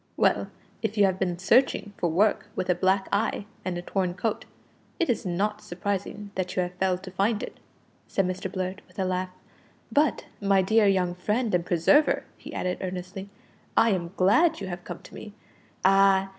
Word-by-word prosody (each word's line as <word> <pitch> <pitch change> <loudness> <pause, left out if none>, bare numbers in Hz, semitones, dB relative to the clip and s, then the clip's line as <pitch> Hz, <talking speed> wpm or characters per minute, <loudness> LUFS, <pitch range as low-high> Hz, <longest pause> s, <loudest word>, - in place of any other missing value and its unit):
"Well, - - +2 0.3
if 220 -1 -2
you 205 - +6
have 190 -1 0
been 180 -2 0
searching 205 +2 +2
for 175 - 0
work 200 +6 +2
with 185 - 0
a - - +5
black 190 +2 +1
eye 205 0 0 0.2
and 180 -1 -2
a 175 - -5
torn 180 -1 -1
coat, 220 +2 -2 0.5
it 335 - +2
is 225 -3 -2
not 210 +4 -1
surprising 200 +1 -4
that 185 -1 -3
you 185 - +2
have 180 0 -5
failed 185 0 0
to 185 - -8
find 205 +4 0
it," - - -8 0.5
said 195 - +1
Mr 185 0 -3
Blurt, 185 +1 -3
with - - -23
a 190 - 0
laugh. 185 0 -1 0.6
"But, 295 +1 +2 0.2
my 195 -1 +3
dear 220 +2 +4
young 185 -3 +2
friend 210 +5 -1
and 175 -1 +2
preserver," 175 - +3
he - - -11
added 180 0 -2
earnestly, 185 +1 -5 0.5
"I 230 - +5
am 175 -2 -2
glad 310 - +4
you 195 - -4
have 175 0 -6
come 175 - -8
to - - -14
me. 210 - -9 0.5
Ah! 195 0 +5
190 Hz, 190 wpm, -26 LUFS, 180-205 Hz, 0.6 s, you